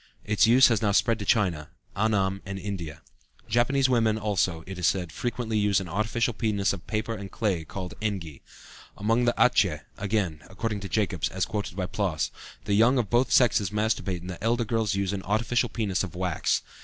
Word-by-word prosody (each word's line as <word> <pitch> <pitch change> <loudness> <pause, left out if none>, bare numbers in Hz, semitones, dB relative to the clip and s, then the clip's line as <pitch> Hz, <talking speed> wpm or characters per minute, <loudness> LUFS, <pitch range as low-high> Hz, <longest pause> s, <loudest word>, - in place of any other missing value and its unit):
Its 105 +1 +3
use 125 +3 +7
has 115 -4 +1
now 105 -2 +2
spread 115 +2 +2
to 100 - -4
China, 90 -9 +1 0.3
Annam, 100 -2 +1
and 95 0 -6
India. 85 -6 -6 0.4
Japanese 130 +4 +2
women 115 -4 +2
also, 95 -6 0
it 95 -1 -7
is 90 - +2
said, 90 -4 0
frequently 115 +2 -2
use 105 -2 +3
an 95 - -6
artificial 110 +6 0
penis 105 -4 0
of 90 -4 -9
paper 110 +1 -2
or 100 - -6
clay, 95 -5 -1
called 90 +3 -7
e.g.. 95 -9 -4 0.6
Among 115 +4 +1
the 120 - +2
Atjeh, 95 -11 +3 0.2
again, 100 -7 -1
according 105 +2 -3
to 100 -1 -7
Jacobs 95 -7 0
(as 95 0 -1
quoted 105 -5 -4
by 95 -1 -2
Ploss), 90 -6 -1 0.3
the 105 - 0
young 115 +6 +5
of 115 -6 -1
both 120 +2 +2
sexes 110 -6 +4
masturbate 105 -4 -1
and 90 - -8
the 90 - -9
elder 120 +1 +1
girls 110 -2 0
use 100 0 -1
an 100 - -3
artificial 115 +4 0
penis 105 -5 -1
of 90 -2 -6
wax. 90 -2 0
105 Hz, 190 wpm, -26 LUFS, 95-115 Hz, 0.6 s, use